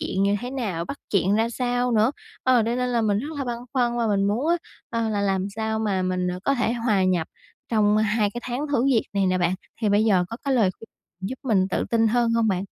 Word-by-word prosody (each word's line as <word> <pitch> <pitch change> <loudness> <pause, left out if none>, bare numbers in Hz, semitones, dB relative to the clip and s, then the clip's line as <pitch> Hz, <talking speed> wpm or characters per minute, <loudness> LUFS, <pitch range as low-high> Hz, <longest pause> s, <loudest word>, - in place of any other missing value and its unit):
chuyện 190 0 -1
như 200 +1 +2
thế 245 +1 -5
nào? 210 -11 -3
Bắt 280 - -6
chuyện 195 0 +2
ra 225 +2 +2
sao 245 0 0
nữa? 220 +2 +4 0.3
Ờ, 255 -2 +4
đây 230 +2 -1
nên 250 0 0
là 240 -1 +1
mình 205 -2 +2
rất 280 +7 -4
là 275 - -2
băn 240 -2 -3 0.2
khoăn 240 -3 +1
và 230 - +1
mình 200 -2 +1
muốn 225 +10 0
á, 345 - +4 0.3
ờ, 230 -2 -1
là 205 -2 -1
làm 195 -1 0
sao 220 0 -1
mà 200 -4 0
mình, 185 0 -1
à, 180 - -4
có 275 - +2
thể 240 -3 0
hòa 225 -5 +1
nhập 180 -3 +1 0.4
trong 210 -2 +3
2 215 -1 +2
cái 240 - -4
tháng 245 +1 -3
thử 275 -4 +1
việc 260 -5 +3
này 200 -1 +1
nè 185 0 +1
bạn, 175 0 +1 0.3
thì 215 - +1
bây 205 +1 +3
giờ 190 -5 +3
có 230 - -6
cái 275 -1 +1
lời 215 -7 +3
khuyên 225 - -13 0.4
giúp 260 - -6
mình 195 -7 +2
tự - - 0
tin 225 -1 +3
hơn 235 +1 +2
hông 230 -1 +2
bạn? 190 -1 0
220 Hz, 265 wpm, -24 LUFS, 195-240 Hz, 0.4 s, nữa